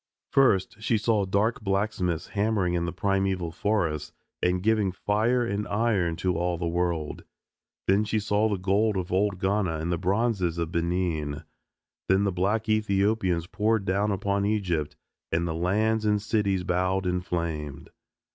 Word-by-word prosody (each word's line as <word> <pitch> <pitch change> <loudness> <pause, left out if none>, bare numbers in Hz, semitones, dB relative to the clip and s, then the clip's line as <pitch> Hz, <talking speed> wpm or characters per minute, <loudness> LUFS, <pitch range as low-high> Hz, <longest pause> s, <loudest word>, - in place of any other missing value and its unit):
First 110 -7 +3
she 110 0 +1
saw 110 -2 +1
dark 105 +4 +1
blacksmiths 95 -4 -1
hammering 100 -4 0
in 85 -1 0
the 85 - -2
primeval 95 -2 0
forests 80 -6 -1 0.3
and 90 0 +1
giving 110 -3 +2
fire 110 +6 +1
and 105 -1 -2
iron 100 -6 +1
to 90 +1 -1
all 85 +1 0
the 85 0 -2
world. 85 -2 -2 0.6
Then 100 +2 +3
she 110 +1 0
saw 105 +1 +1
the 100 - 0
gold 100 +3 +1
of 90 -1 -3
old 100 +1 +1
Ghana 95 -3 0
and 80 +3 -3
the 85 - -1
bronzes 95 -2 0
of 85 -1 -2
Benin. 85 -4 -1 0.7
Then 95 +1 +4
the 100 - +1
black 100 +5 0
Ethiopians 100 -4 +1
poured 105 +2 0
down 100 +3 +1
upon 100 +1 0
Egypt 95 -8 -1 0.4
and 85 +1 +1
the 80 - -2
lands 105 +6 +1
and 105 -1 +2
cities 100 -3 0
bowed 90 +2 0
and 90 0 0
flamed. 80 -5 -4
95 Hz, 155 wpm, -27 LUFS, 85-105 Hz, 0.7 s, Then